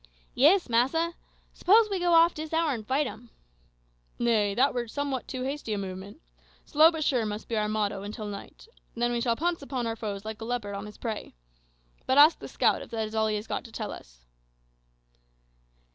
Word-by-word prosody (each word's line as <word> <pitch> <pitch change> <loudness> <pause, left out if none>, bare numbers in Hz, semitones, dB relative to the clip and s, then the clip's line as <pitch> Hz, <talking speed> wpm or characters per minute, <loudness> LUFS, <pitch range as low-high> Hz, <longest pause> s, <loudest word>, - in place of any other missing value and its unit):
"Yis, 335 +8 +5
massa. 270 +9 +1 0.4
S'pose 430 +4 +5
we 390 - 0
go 350 0 +1
off 335 +1 +6
dis 310 +1 -7
hour 325 -2 +2
and 220 -3 -6
fight 275 +3 +1
'em?" 240 -2 -8 0.9
"Nay; 215 -4 +2
that 265 +5 +3
were 240 -1 -2
somewhat 275 +1 -3
too 255 -1 -4
hasty 270 -4 -3
a - - -1
movement. 195 +5 -7 0.5
`Slow 310 +3 +6
but 320 -2 -3
sure' 255 -5 +1
must 210 0 -5
be 230 - -2
our 210 -1 0
motto 205 -2 -1
until 210 +2 -6
night. 205 - -9 0.3
Then 240 +1 0
we 240 -1 -1
shall 235 -1 +1
pounce 340 +4 -1
upon 265 -3 -3
our 225 0 -2
foes 205 -2 -5
like 220 0 -6
a - - -4
leopard 230 -4 -3
on 200 +1 -5
his 210 - -12
prey. 220 - -5 0.7
But 260 - +2
ask 300 +3 +7
the - - -8
scout - - +1
if - - -10
that 220 -1 -2
is 215 - -11
all 220 0 +2
he 215 - 0
has 210 +1 -4
got - - -3
to 230 - -12
tell 215 -1 -5
us." - - -13
235 Hz, 205 wpm, -28 LUFS, 215-290 Hz, 0.9 s, ask